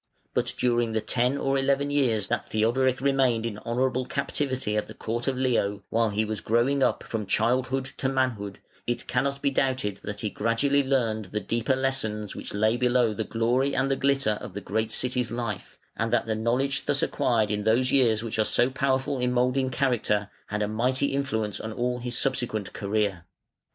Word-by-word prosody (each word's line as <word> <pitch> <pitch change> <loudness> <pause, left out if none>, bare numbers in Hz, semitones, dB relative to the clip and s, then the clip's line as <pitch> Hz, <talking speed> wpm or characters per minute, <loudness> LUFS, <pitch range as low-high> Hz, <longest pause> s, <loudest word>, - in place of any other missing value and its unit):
But - - 0
during 120 -2 +1
the 110 - +1
ten 125 +5 +1
or 135 0 +1
eleven 140 +1 +1
years 120 -8 +2
that - - -2
Theodoric 125 +4 +1
remained 130 -4 +2
in 105 -3 -4
honourable 125 +2 -1
captivity 135 -5 -1
at 105 - -1
the - - -10
court 120 +3 -3
of 135 -1 0
Leo, 115 -6 0
while 115 0 +2
he 105 +1 0
was 110 -1 -4
growing 120 +5 +2
up - - +2
from 110 -3 -4
childhood 130 +5 +1
to 130 - 0
manhood, 120 -7 -1 0.3
it 120 - -2
cannot 140 +2 -1
be 140 - +3
doubted 130 -7 0
that 105 0 -5
he 105 - -2
gradually 115 +6 +2
learned 120 -6 0
the 105 +3 -3
deeper 115 +5 0
lessons 110 -6 -2
which - - -5
lay 110 +3 +2
below 125 -2 +2
the 110 - -2
glory 120 +5 +1
and 135 +1 +1
the - - +3
glitter 135 -6 +1
of - - -8
the - - -2
great 110 +3 -1
city's 125 -1 0
life, 115 -4 -5 0.2
and 115 0 -1
that 120 -1 +2
the 110 - -1
knowledge 125 +5 0
thus 140 -1 +2
acquired 110 -4 +1
in 105 0 -1
those 120 +4 +3
years 115 -5 +3
which 110 -1 -2
are - - +5
so 120 +4 +2
powerful 135 +1 0
in 125 0 +1
moulding 125 +2 +1
character, 120 -6 0 0.2
had 105 0 -1
a - - 0
mighty 125 +6 0
influence 110 -7 -1
on 110 - -5
all 125 +2 -1
his 120 0 -3
subsequent 110 -6 -1
career. 100 -4 -1
120 Hz, 190 wpm, -26 LUFS, 110-130 Hz, 0.3 s, are